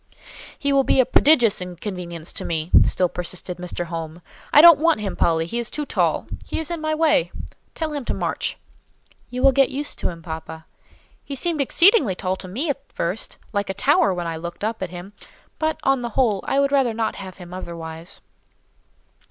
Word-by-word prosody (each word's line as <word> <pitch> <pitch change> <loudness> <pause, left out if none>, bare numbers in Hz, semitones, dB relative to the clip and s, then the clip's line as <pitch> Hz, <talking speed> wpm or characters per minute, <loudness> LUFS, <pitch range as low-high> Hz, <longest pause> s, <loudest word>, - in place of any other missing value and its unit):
"He 280 -1 0
will 275 0 +4
be 265 - +2
a 260 - +6
prodigious 250 -5 +4
inconvenience 180 -2 -6
to - - -6
me," 160 0 -3
still 180 - +1
persisted 180 +1 -5
Mr. 175 0 -4
Home. 165 0 -6 0.3
"I - - +7
don't 335 -1 +9
want 330 -4 +3
him, 205 -2 -3
Polly, 165 -1 +2
he 235 +8 -3
is 235 - -2
too 300 - -4
tall; - - 0 0.2
he - - -5
is 320 0 -3
in 335 -2 -3
my 310 0 0
way. 305 - +2 0.4
Tell 315 -2 -3
him 290 -2 -3
to - - -1
march." - - -2 0.7
"You 250 +1 -4
will 275 - +7
get 270 +1 +3
used 285 +2 -3
to - - -1
him, 165 -2 -9
papa. 160 -1 -7 0.6
He 280 - -6
seemed 320 +2 -1
exceedingly 335 - +4
tall 185 +1 -2
to 185 - -9
me 245 - -3
at 280 -1 -4
first—like 200 +2 -4
a 190 - -2
tower 200 0 +3
when 175 -2 -3
I 165 -1 -3
looked 170 +4 -7
up 220 0 -2
at 185 - -3
him; 180 +3 -9 0.5
but, 315 0 0
on 270 -1 +2
the 240 - -3
whole, 215 -4 +1
I 275 - +2
would 280 0 +2
rather 265 -5 +2
not 225 -1 -1
have 190 -2 -9
him 180 -1 -11
otherwise." 165 -2 -7
205 Hz, 200 wpm, -22 LUFS, 175-275 Hz, 0.7 s, don't